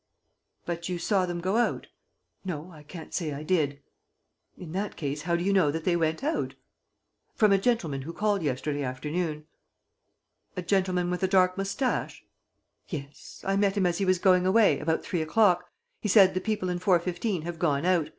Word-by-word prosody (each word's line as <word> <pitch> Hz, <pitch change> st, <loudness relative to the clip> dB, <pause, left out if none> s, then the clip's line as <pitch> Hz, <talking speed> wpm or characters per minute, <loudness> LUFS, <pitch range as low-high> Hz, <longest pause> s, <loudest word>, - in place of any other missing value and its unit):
"But 170 Hz, 0 st, -4 dB
you 180 Hz, -, -2 dB
saw 185 Hz, +1 st, +1 dB
them 175 Hz, -1 st, -3 dB
go 190 Hz, +5 st, 0 dB
out?" 240 Hz, -, 0 dB, 0.6 s
"No, 175 Hz, -2 st, -5 dB
I 155 Hz, -3 st, -13 dB
can't 160 Hz, +2 st, -10 dB
say 160 Hz, -5 st, -2 dB
I 140 Hz, +2 st, -6 dB
did." 145 Hz, -5 st, 0 dB, 0.7 s
"In 170 Hz, -3 st, -9 dB
that 195 Hz, +4 st, -3 dB
case, 145 Hz, -1 st, -3 dB
how 170 Hz, +2 st, 0 dB
do 170 Hz, -, -1 dB
you 200 Hz, +2 st, +2 dB
know 185 Hz, -6 st, +4 dB
that 160 Hz, +2 st, -3 dB
they 175 Hz, 0 st, +2 dB
went 160 Hz, +6 st, 0 dB
out?" 310 Hz, +3 st, -1 dB, 0.8 s
"From 215 Hz, -2 st, +4 dB
a 195 Hz, -, +5 dB
gentleman 185 Hz, -, 0 dB
who 150 Hz, +5 st, -6 dB
called 205 Hz, +1 st, 0 dB
yesterday 145 Hz, 0 st, -2 dB
afternoon." 150 Hz, +4 st, -3 dB, 1.1 s
"A 180 Hz, -, -2 dB
gentleman 180 Hz, -1 st, +1 dB
with 180 Hz, -, -2 dB
a 190 Hz, -, +2 dB
dark 185 Hz, -1 st, +3 dB
mustache?" 195 Hz, +7 st, -2 dB, 0.6 s
"Yes. 145 Hz, -5 st, -8 dB
I 195 Hz, 0 st, +1 dB
met 200 Hz, 0 st, +1 dB
him 195 Hz, -, +2 dB
as 175 Hz, -1 st, 0 dB
he 195 Hz, -, +1 dB
was 185 Hz, 0 st, +3 dB
going 185 Hz, 0 st, +4 dB
away, 200 Hz, -6 st, +4 dB
about 160 Hz, +2 st, -1 dB
three 175 Hz, -, -2 dB
o'clock. 180 Hz, +1 st, +2 dB, 0.3 s
He -, -, -3 dB
said: 195 Hz, -2 st, +6 dB
'The 185 Hz, -, -1 dB
people 210 Hz, -4 st, -2 dB
in 175 Hz, 0 st, -2 dB
415 180 Hz, 0 st, 0 dB
have 170 Hz, 0 st, -6 dB
gone 145 Hz, 0 st, +1 dB
out. 180 Hz, -4 st, +3 dB
Mr. -, -, -15 dB
180 Hz, 190 wpm, -27 LUFS, 160-195 Hz, 1.1 s, said